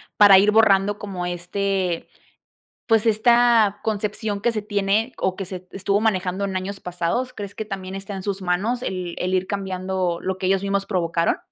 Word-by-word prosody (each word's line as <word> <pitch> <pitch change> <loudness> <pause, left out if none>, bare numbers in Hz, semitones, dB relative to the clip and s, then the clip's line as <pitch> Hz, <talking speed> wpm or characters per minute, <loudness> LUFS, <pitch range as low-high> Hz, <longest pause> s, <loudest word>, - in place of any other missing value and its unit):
para 200 -2 +8
ir 205 +2 +4
borrando 205 -2 +4
como, 190 -4 -5
este, 180 0 -2 0.8
pues 225 0 +3
esta 230 -1 +4
concepción 210 0 -2
que 235 +4 +1
se 215 -2 -3
tiene, 205 +3 0
o 185 0 -1
que 195 - -5
se 185 0 -8
estuvo 200 +1 0
manejando 195 -3 0
en 190 -1 -4
años 190 +1 -4
pasados? 180 +8 -2
¿Crees 205 -1 -7
que 220 - -4
también 190 -2 -6
está 195 +1 -6
en 190 - -5
sus 200 -1 -3
manos 195 +7 -1
el 180 -2 -4
el 185 +1 -2
ir 185 0 +1
cambiando 185 -3 -2
lo 190 0 -2
que 185 - -4
ellos 195 0 +2
mismos 200 0 0
provocaron? 170 -4 0
195 Hz, 180 wpm, -22 LUFS, 185-210 Hz, 0.8 s, para